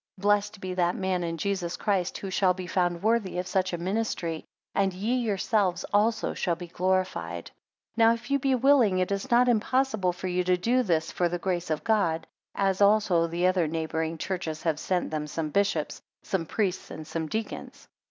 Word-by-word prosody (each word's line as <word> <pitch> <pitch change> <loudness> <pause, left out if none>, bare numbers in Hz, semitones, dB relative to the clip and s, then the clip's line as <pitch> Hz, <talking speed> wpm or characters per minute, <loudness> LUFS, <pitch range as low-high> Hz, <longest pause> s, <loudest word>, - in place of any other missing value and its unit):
2 - - -15
Blessed 205 0 +2
be 185 -1 -4
that 175 -1 +1
man 190 -2 -1
in 165 -1 -3
Jesus, 180 -1 -2
Christ, 195 -4 0
who 195 - -6
shall 185 -1 +3
be 185 0 -6
found 175 -1 0
worthy 220 -4 +1
of 180 - -1
such 185 0 0
a 175 - -2
ministry; 175 -3 -2 0.3
and 195 -1 +1
ye 210 +6 -1
yourselves 205 -5 0
also 220 +2 +2
shall 175 -2 0
be 175 +1 -8
glorified. 185 +2 -1 0.4
3 230 - +2
Now 225 +1 +7
if 240 +3 -10
you 280 - +3
be 270 0 +2
willing, 250 -6 +4
it 185 +1 0
is 200 0 -2
not 245 +1 +5
impossible 230 -4 +2
for 175 +1 -8
you 180 0 0
to 180 0 +2
do 240 +8 +2
this 165 -7 0
for 175 -1 +1
the 175 - -2
grace 175 -1 -2
of 155 -1 -1
God; 200 -8 +1 0.3
as 195 0 +1
also 200 -5 +4
the 170 +2 -1
other 185 -3 +3
neighbouring 160 0 -2
churches 165 -3 -4
have 160 -3 0
sent 180 -1 -1
them 150 -1 -2
some 155 0 -3
bishops, 195 -6 0 0.2
some 170 -4 -2
priests 195 -2 -1
and 155 - -8
some 160 0 -3
deacons. 220 +7 -5
185 Hz, 200 wpm, -27 LUFS, 170-210 Hz, 0.4 s, Now